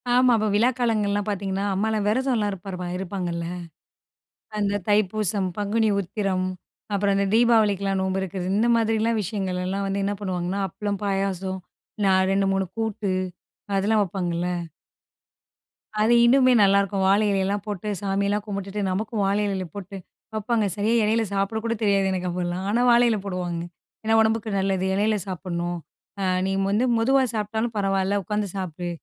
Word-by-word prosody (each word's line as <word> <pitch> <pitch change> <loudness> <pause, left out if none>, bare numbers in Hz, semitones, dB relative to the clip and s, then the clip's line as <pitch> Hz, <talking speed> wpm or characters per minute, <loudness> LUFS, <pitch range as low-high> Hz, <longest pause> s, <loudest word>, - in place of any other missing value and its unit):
ஆமா. 250 0 +5
அப்ப 215 0 0
விழா 230 +4 +4
காலங்கள்லாம் 210 -3 +1
பார்த்தீங்கன்னா, 195 0 -2
அம்மாலாம் 215 +1 0
விரதம்லாம் 230 -2 +1
இருப்பார் 190 0 -7 0.2
இருப்பாங்கல்ல, 175 -3 -3 1.1
அந்த 205 0 0
தைப்பூசம், 205 -1 +1
பங்குனி 215 +2 +1
உத்திரம், 190 -1 -1 0.5
அப்புறம் 200 0 +2
அந்த 200 0 +2
தீபாவளிக்கெல்லாம் 210 -5 +3
நோம்பு 190 0 0
இருக்கிறது, 185 -1 -4
இந்த 235 +3 +3
மாதிரிலாம் 225 0 +1
விஷயங்கள்லாம் 190 -1 -2
வந்து 195 0 -1
என்ன 205 +1 -1
பண்ணுவாங்கன்னா, 185 0 -2
அப்பளம், 205 +2 -3
பாயாசம், 195 -1 -1 0.5
நா 190 - +4 0.2
2 195 0 +2
3 195 0 0
கூட்டு 215 -3 -1 0.6
அதெல்லாம் 210 +2 +3
வப்பாங்கல்ல. 175 -2 -2 1.5
அது 220 +3 +4
இன்னுமே 255 +1 +5
நல்லாயிருக்கும். 200 0 +3
வாழை 205 +2 +4
இலையலாம் 195 +1 0
போட்டு, 205 -1 -4
சாமியெல்லாம் 200 +1 0
கும்பிட்டுட்டு, 200 0 -4
நமக்கும் 210 +2 -1
வாழை 200 +2 +1
இலையில 190 -2 -2
போட்டு 200 -1 -7 0.4
வப்பாங்க. 220 0 0
சரியா 215 +3 +1
இலையில 220 +2 +2
சாப்பிட 200 +3 0
கூட 230 0 0
தெரியாது 195 -2 +3
எனக்கு 185 -1 -2
அப்பலாம். 175 +1 -3
ஆனா, 230 +4 +2
வாழை 240 +1 +6
இலை 220 -2 +1
போடுவாங்க. 180 -3 -3 0.4
ஏன்னா, 220 +1 +2
உடம்புக்கு 220 0 +1
நல்லது 190 -1 0
இலையில 210 +2 +2
சாப்பிடணும், 175 -2 -3 0.4
அ - - 0 0.2
"நீ - - 0 0.2
வந்து 210 +4 +2
மெதுவா 265 +4 +3
சாப்பிட்டாலும் 220 +2 -2
பரவாயில்ல 195 0 +1
உட்காந்து 210 +2 -2
சாப்பிடு." 175 -2 -4
200 Hz, 145 wpm, -24 LUFS, 190-215 Hz, 1.5 s, வாழை